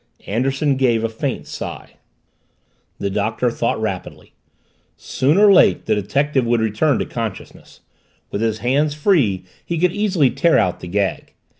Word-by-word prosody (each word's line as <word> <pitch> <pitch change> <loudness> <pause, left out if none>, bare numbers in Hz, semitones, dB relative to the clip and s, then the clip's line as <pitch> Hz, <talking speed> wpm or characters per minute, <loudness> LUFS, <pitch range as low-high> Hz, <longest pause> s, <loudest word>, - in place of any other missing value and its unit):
Anderson 135 +5 0
gave 120 -4 +2
a 115 - 0
faint 110 - -4
sigh. - - -7 1.1
The 100 - -3
Doctor 110 +4 -1
thought 115 -1 -1
rapidly. 100 -5 -5 0.6
Soon 145 +6 0
or 205 -1 +6
late - - +4
the 110 - +1
detective 135 +7 0
would 120 0 +1
return 110 +6 +1
to - - -2
consciousness 115 -4 -7 0.5
with 100 - -3
his 110 -1 0
hands 145 +4 +1
free 140 - +1 0.2
he 170 - -3
could 180 +2 +2
easily 190 -10 +1
tear 170 -1 +2
out 90 - +1
the - - -8
gag. 100 +2 -2
120 Hz, 150 wpm, -19 LUFS, 110-150 Hz, 1.1 s, or